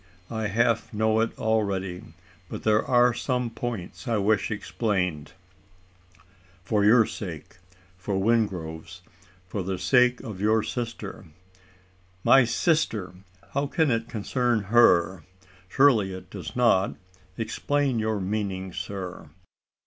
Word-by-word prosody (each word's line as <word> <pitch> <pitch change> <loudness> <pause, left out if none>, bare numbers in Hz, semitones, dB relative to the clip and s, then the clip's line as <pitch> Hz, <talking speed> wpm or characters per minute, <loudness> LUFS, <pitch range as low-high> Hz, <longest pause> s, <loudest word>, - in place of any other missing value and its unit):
I 110 -2 -2
half 115 +2 +1
know 110 +1 +1
it 115 +1 -1
already; 100 -5 -1 0.5
but - - -7
there 110 0 +3
are 125 -1 +4
some 125 -1 -2
points 115 0 -6
I 115 -2 +1
wish 105 0 +1
explained 95 -8 -2 1.3
for 105 +2 +1
your 115 +2 +6
sake 85 -6 -8 0.4
for 95 +2 -3
Wingrove's 95 -5 -1 0.4
for 95 +2 -4
the 95 +1 -3
sake 125 +4 +3
of 110 -7 -7
your 110 +1 +3
sister 115 -4 -5 0.5
" 90 0 -34
"My 135 -2 +7
sister! 115 - 0 0.4
how 140 +1 -1
can 155 -1 +1
it 115 0 -1
concern 120 +1 0
her? 90 -6 +5 0.5
Surely 110 -7 +4
it 95 - -11
does - - -7
not? 115 -6 +3 0.4
Explain 135 +2 -1
your 110 -1 -1
meaning, 95 -2 -3
sir." 90 -6 -6
110 Hz, 120 wpm, -26 LUFS, 95-120 Hz, 1.3 s, My